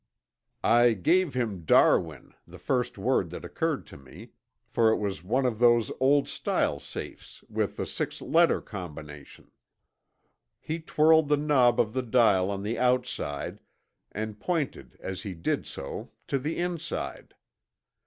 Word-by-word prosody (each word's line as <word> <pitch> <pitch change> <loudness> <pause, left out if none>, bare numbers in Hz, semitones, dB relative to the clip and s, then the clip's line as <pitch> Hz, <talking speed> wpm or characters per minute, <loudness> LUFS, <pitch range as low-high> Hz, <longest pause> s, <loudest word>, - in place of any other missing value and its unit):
"I 120 0 +5
gave 150 - +2
him 110 -8 -2
'Darwin,' 80 -2 +3
the - - -12
first - - -1
word - - +1
that - - -8
occurred - - -2
to - - -13
me, 65 -2 -14 0.3
for 115 -1 +2
it 110 - +3
was 100 -4 -3
one 130 +8 0
of 115 -4 -1
those 120 -2 +4
old 140 +2 +3
style 70 - -1
safes - - -9
with - - -2
the - - -2
six - - -3
letter - - +3
combination. 75 -4 -10 1.1
He 160 +2 -4
twirled 160 -1 +3
the 150 - +4
knob 135 -5 +3
of 110 -1 +1
the 130 - 0
dial 110 -6 +3
on 100 -1 -3
the 115 +3 -2
outside 125 - -1 0.5
and 105 0 -5
pointed 165 -2 -3
as 95 -1 -5
he 100 -5 -6
did 85 - -2
so 70 - -7 0.2
to 140 - -1
the 150 +5 -3
inside. 170 -2 -4
120 Hz, 145 wpm, -27 LUFS, 95-140 Hz, 1.1 s, I